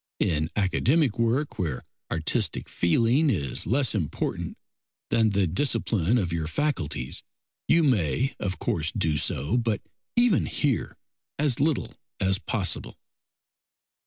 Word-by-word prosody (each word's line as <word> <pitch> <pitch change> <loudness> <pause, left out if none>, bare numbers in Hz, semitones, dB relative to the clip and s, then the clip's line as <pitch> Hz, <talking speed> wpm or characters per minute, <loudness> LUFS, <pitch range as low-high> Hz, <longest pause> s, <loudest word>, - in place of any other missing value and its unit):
In 80 -1 0
academic 120 - +2
work, 120 +6 0
where 75 -9 -2 0.3
artistic 80 -1 -1
feeling 120 - +2
is 75 - -1
less 130 +1 +2
important 90 -9 -3 0.5
than 110 -1 +4
the 100 -1 +2
discipline 105 - +1
of 90 -7 -1
your 80 -2 -1
faculties, 80 - -2 0.5
you 165 0 +4
may, 125 - +1
of 95 -2 -2
course, 80 0 -1
do 80 -1 0
so, 75 - 0
but 115 -4 0 0.4
even 240 -5 +3
here 140 -6 -1 0.4
as 140 -4 +1
little 150 +1 0 0.3
as 95 0 +2
possible. 100 -4 -2
105 Hz, 120 wpm, -26 LUFS, 85-135 Hz, 0.5 s, than